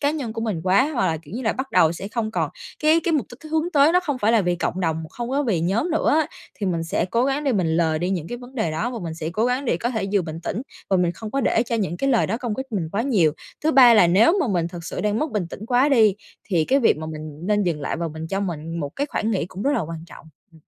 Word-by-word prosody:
cá 285 0 +2
nhân 275 -8 -4
của 225 - -5
mình 215 -8 -2
quá 200 +11 +3
hoặc 190 - +1
là, 160 - 0
kiểu 160 +7 -11
như 255 - -4
là, 220 - +1
bắt 265 +1 -5
đầu 160 0 +4
sẽ 195 +4 -6
không 225 -1 -2
còn - - -1 0.3
cái 315 +2 +5
cái 335 - +1
mục 290 -7 +1
đích 300 +5 -12
hướng 320 +2 +1
tới 290 +2 +5
nó 360 - +4
không 290 -7 -3
phải 220 0 +2
là 230 - +5
vì 175 -1 0
cộng 180 +2 -2
đồng, 160 -2 -1
không 240 0 -5
có 280 +2 +1
vì 210 - 0
nhóm 200 - 0
nữa 320 - +1
á. 305 - 0 0.3
Thì 205 - -4
mình 170 -3 0
sẽ 165 - 0
cố 235 +7 +1
gắng 275 +2 -1
để 270 - +2
mình 190 -6 +1
lờ 160 -2 +2
đi 180 +3 -1
những 175 -5 -2
cái 240 - -5
vấn 250 +1 -13
đề 220 -11 -1
đó 160 +10 -2
và 240 - -5
mình 165 -2 -4
sẽ 160 0 -4
cố 215 +6 0
gắng 250 +3 0
để 230 - +1
có 235 +7 -2
thể 220 -5 -2
vừa 200 -3 +3
bình 160 0 -6
tĩnh 215 +8 -3 0.3
và 190 - +4
mình 175 -1 +1
không 220 +2 -8
có 275 - 0
để 230 -2 +2
cho 235 -1 -3
những 185 -6 -2
cái 275 +5 0
lời 235 - +3
đó 225 - -1
công 240 -3 -3
kích 265 +3 -5
mình 175 -6 -1
quá 205 +3 0
nhiều. 195 - +3 0.3
Thứ 315 - +3
ba 245 -3 +8
là 205 -5 +6
nếu 220 - +4
mà 280 - +1
mình 175 -4 0
thực 170 -1 -9
sự - - -4
đang 210 +1 0
mất 305 +3 -1
bình 205 -7 -1
tĩnh 215 - -8
quá 250 +4 +3
đi, 220 -8 +5 0.3
thì 170 -5 +2
cái 270 - +3
việc 230 - +4
mà 155 0 -6
mình 155 -1 -8
nên 210 -1 +2
dừng 170 -5 -1
lại 140 - -2
và 165 0 -2
mình 160 +1 -7
cho 195 +2 -1
mình 165 -3 -4
một 145 - -2
cái 285 - 0
khoản 220 -5 -2
nghĩ 190 -5 0
cũng 190 +2 -7
rất 285 - +2
là 240 - +1
quan 165 -1 -6
trọng. 170 - -14 0.3
Ừm. 160 - -19
210 Hz, 320 wpm, -23 LUFS, 170-255 Hz, 0.3 s, ba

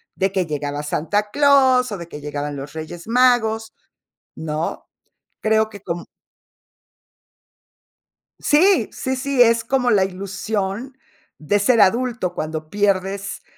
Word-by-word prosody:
de 190 0 0
que 190 -2 0
llegaba 145 -1 -4
Santa 205 +8 -1
Claus, 265 -4 +4
o 205 - -3
de 170 -2 -8
que 150 -3 -9
llegaban 145 0 -4
los 140 +1 -8
Reyes 160 +3 -8
Magos, 225 -2 +2 0.6
¿no? 155 0 -4 0.5
Creo 220 0 +2
que 205 -3 -11
com 175 -3 -5 2.4
Sí, 365 +7 +4
sí, 260 -1 -3
sí, 275 -1 +1
es 230 -1 +4
como 250 0 +1
la 195 -3 +4
ilusión 200 +5 -4 0.4
de 180 +7 +1
ser 225 +2 +4
adulto 235 -3 +1
cuando 155 -1 -5
pierdes 200 0 -1
205 Hz, 125 wpm, -21 LUFS, 170-245 Hz, 2.4 s, Claus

